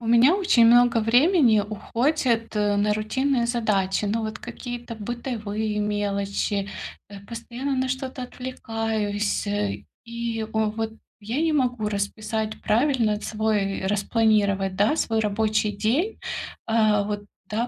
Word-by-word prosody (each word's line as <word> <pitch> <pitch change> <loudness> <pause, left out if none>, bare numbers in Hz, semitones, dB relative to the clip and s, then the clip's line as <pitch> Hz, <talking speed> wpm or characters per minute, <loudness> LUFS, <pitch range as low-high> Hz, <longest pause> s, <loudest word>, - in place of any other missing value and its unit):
У 230 - -6
меня 235 +8 +6
очень 360 - +4
много 240 0 +6
времени 245 - +4
уходит 230 +3 -1
на 205 0 +2
рутинные 240 +4 0
задачи. 210 -5 0
Ну, 220 +3 0
вот, 215 0 -4
какие-то 240 -1 -7
бытовые 220 -2 -3
мелочи, 200 -1 -1 0.4
э, 200 -1 -9
постоянно 240 +4 -4
на 260 0 0
что-то 260 0 -4
отвлекаюсь, 225 -5 -2
э, 205 0 -2 0.2
и, 235 -1 -3
вот, 220 0 -1 0.3
я 230 +8 -2
не 325 -1 +2
могу 250 -6 +1
расписать 215 +1 -3
правильно 230 -3 +2
свой 210 -3 -1
распланировать, 200 -2 +2
да, 210 +9 +3
свой 225 -6 +1
рабочий 215 0 +1
день. 240 - 0 0.5
Э, 215 -2 +3
вот, 205 0 -3 0.3
да, 225 +3 -1
220 Hz, 120 wpm, -24 LUFS, 210-240 Hz, 0.5 s, меня